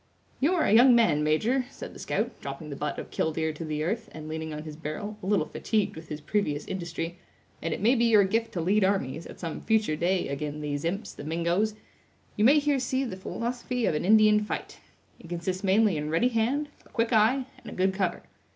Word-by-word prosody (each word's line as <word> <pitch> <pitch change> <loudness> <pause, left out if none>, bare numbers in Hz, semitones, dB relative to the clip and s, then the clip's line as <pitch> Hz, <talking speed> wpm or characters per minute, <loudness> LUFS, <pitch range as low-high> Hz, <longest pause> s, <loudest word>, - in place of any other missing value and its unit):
"You 315 +7 +3
are 330 - +2
a - - +3
young 245 +2 +8
man, 165 -11 +4
major," 225 - +2
said - - -9
the - - -12
scout, - - -1
dropping 140 +2 -6
the - - -4
butt 150 +1 -3
of - - -7
"killdeer" 160 0 -1
to 150 - -7
the 155 -1 -2
earth, 220 +7 -2
and 155 -1 -8
leaning 160 0 -4
on 150 0 -5
the 155 - -7
barrel, 165 +8 -6
a 190 - -6
little 205 0 +2
fatigued 215 -3 -1
with 160 +1 -10
his 150 - -5
previous 150 -3 -1
industry; 170 -1 -4 0.4
"and 165 - -2
it - - -3
may 230 +5 +5
be 235 -2 +3
your 215 -3 +6
gift 225 +4 0
to 175 - -2
lead 200 +5 +3
armies, 170 -6 0
at - - -12
some 165 -2 -5
future 215 -8 +2
day, 180 +4 +1
ag'in 150 +2 -4
these 145 -1 -3
imps, 195 +5 -3
the - - -9
Mingoes. 170 +7 0 0.6
You 210 - +2
may 280 +5 +7
here 290 -2 +2
see 260 +1 0
the 235 -8 -4
philosophy 240 +5 -3
of - - +2
an 150 - -1
Indian 215 +1 +5
fight. 210 - -5 0.4
It 170 - -13
consists 180 +2 -3
mainly 195 -2 +3
in 150 0 -3
ready 165 +11 +2
hand, 255 +6 0
a - - -21
quick 230 +1 0
eye 230 +5 +4
and - - -10
a - - -8
good 190 +1 +2
cover. 190 -2 -1
190 Hz, 225 wpm, -27 LUFS, 160-225 Hz, 0.6 s, young